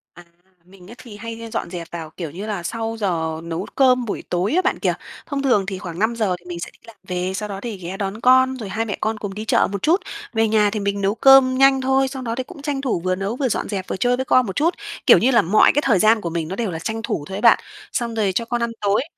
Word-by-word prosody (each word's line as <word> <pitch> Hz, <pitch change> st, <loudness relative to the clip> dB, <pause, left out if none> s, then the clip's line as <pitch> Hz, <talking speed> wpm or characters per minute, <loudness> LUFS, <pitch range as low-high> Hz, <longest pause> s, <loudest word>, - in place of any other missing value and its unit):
À, 175 Hz, -, -13 dB, 0.4 s
mình 185 Hz, 0 st, -17 dB
ấy 235 Hz, -, -10 dB
thì 215 Hz, -5 st, -11 dB
hay 230 Hz, +1 st, -7 dB
dọn -, -, -3 dB
dẹp 170 Hz, -2 st, -6 dB
vào, 165 Hz, -2 st, -6 dB
kiểu 165 Hz, -5 st, -5 dB
như 190 Hz, +6 st, -7 dB
là, 200 Hz, -5 st, -3 dB
sau 225 Hz, +4 st, -3 dB
giờ 160 Hz, -5 st, -1 dB
nấu 170 Hz, +3 st, -4 dB
cơm 255 Hz, -2 st, +4 dB
buổi 210 Hz, -, -4 dB
tối 180 Hz, -, 0 dB
á 370 Hz, -, +4 dB
bạn 375 Hz, -, 0 dB
kìa. -, -, +1 dB, 0.3 s
Thông 280 Hz, -2 st, -3 dB
thường 245 Hz, -8 st, +2 dB
thì 190 Hz, -1 st, -4 dB
khoảng 175 Hz, -1 st, -7 dB
5:00 220 Hz, -4 st, +1 dB
thì 175 Hz, -, -26 dB
mình 175 Hz, -1 st, -6 dB
sẽ -, -, -6 dB
đi -, -, -25 dB
làm 230 Hz, -, -13 dB
về, 180 Hz, 0 st, -2 dB
sau 210 Hz, +1 st, -4 dB
đó 195 Hz, -1 st, -5 dB
thì 230 Hz, -5 st, -5 dB
ghé 185 Hz, +1 st, -6 dB
đón 195 Hz, +2 st, -4 dB
con, 260 Hz, +1 st, +5 dB
rồi 215 Hz, -5 st, -6 dB
hai 220 Hz, +4 st, -2 dB
mẹ 205 Hz, -4 st, -4 dB
con 220 Hz, 0 st, -1 dB
cùng 205 Hz, -2 st, -5 dB
đi 215 Hz, +2 st, -6 dB
chợ -, -, +3 dB
một 200 Hz, -1 st, -4 dB
chút. 345 Hz, +6 st, +3 dB, 0.3 s
Về 225 Hz, 0 st, +2 dB
nhà 210 Hz, -1 st, +3 dB
thì 210 Hz, +1 st, -3 dB
mình 200 Hz, 0 st, -2 dB
nấu 200 Hz, +2 st, +1 dB
cơm 265 Hz, +1 st, +6 dB
nhanh 270 Hz, 0 st, +5 dB
thôi, 265 Hz, +1 st, +2 dB
sau 265 Hz, 0 st, -6 dB
đó 230 Hz, -2 st, -3 dB
thì 260 Hz, -, -3 dB
cũng 280 Hz, -, -12 dB
tranh 285 Hz, -2 st, -2 dB
thủ 235 Hz, -10 st, -1 dB
vừa 185 Hz, 0 st, +1 dB
nấu, 195 Hz, +4 st, -3 dB
vừa 260 Hz, -1 st, 0 dB
dọn -, -, -2 dB
dẹp 190 Hz, -3 st, -4 dB
vừa -, -, -3 dB
chơi 245 Hz, +4 st, +2 dB
với 260 Hz, -, -3 dB
con 255 Hz, -1 st, +4 dB
một 190 Hz, -, -5 dB
chút. 330 Hz, +5 st, +2 dB, 0.3 s
Kiểu -, -, +8 dB
như 260 Hz, -, +3 dB
là 235 Hz, -, +5 dB
mọi 205 Hz, +4 st, +5 dB
cái 290 Hz, -, +3 dB
thời 205 Hz, -8 st, +3 dB
gian 220 Hz, 0 st, +4 dB
của 170 Hz, -, -3 dB
mình 165 Hz, -1 st, -3 dB
nó 190 Hz, -, -4 dB
đều 220 Hz, -5 st, -2 dB
là 160 Hz, -, -5 dB
tranh 220 Hz, +6 st, -4 dB
thủ 210 Hz, -11 st, -2 dB
thôi 190 Hz, -, -5 dB
ấy -, -, -5 dB
bạn. -, -, +6 dB, 0.3 s
Xong 235 Hz, -3 st, -2 dB
rồi 205 Hz, -3 st, +1 dB
cho 230 Hz, -, 0 dB
con 240 Hz, 0 st, -2 dB
ăn 235 Hz, -, -1 dB
tối, 205 Hz, +4 st, +2 dB
215 Hz, 295 wpm, -21 LUFS, 190-245 Hz, 0.4 s, Kiểu